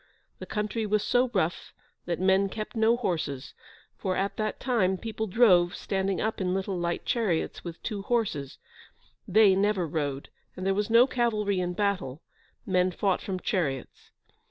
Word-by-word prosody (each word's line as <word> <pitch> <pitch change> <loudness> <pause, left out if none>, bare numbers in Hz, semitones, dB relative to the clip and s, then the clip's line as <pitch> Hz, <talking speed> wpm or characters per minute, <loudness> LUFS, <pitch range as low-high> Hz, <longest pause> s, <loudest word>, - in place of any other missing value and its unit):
The - - -8
country 215 +1 -2
was 210 0 +1
so 245 +4 +2
rough 175 -5 -1 0.3
that 170 -1 -1
men 190 +1 +3
kept 215 +4 -6
no 225 +1 +3
horses, 160 - -3 0.5
for, 185 -2 -1
at 195 +2 -1
that 215 -1 -2
time, 195 -8 +1
people 220 +1 -4
drove, 185 -4 +4
standing 195 -1 -1
up 220 -2 -2
in 180 0 0
little 195 0 -2
light 170 -1 -2
chariots 210 -9 -1
with 170 -1 -7
two 210 -3 -3
horses; 195 - -1 0.7
they 210 0 +6
never 195 -2 +1
rode, 145 -3 -3 0.3
and 185 - -5
there 195 - +2
was 205 +2 -1
no 230 +2 +7
cavalry 215 -6 0
in 180 0 -1
battle: 180 -8 -1 0.4
men 185 -1 +2
fought 190 +1 0
from 190 -2 -4
chariots. 150 - -3
195 Hz, 160 wpm, -28 LUFS, 180-215 Hz, 0.7 s, no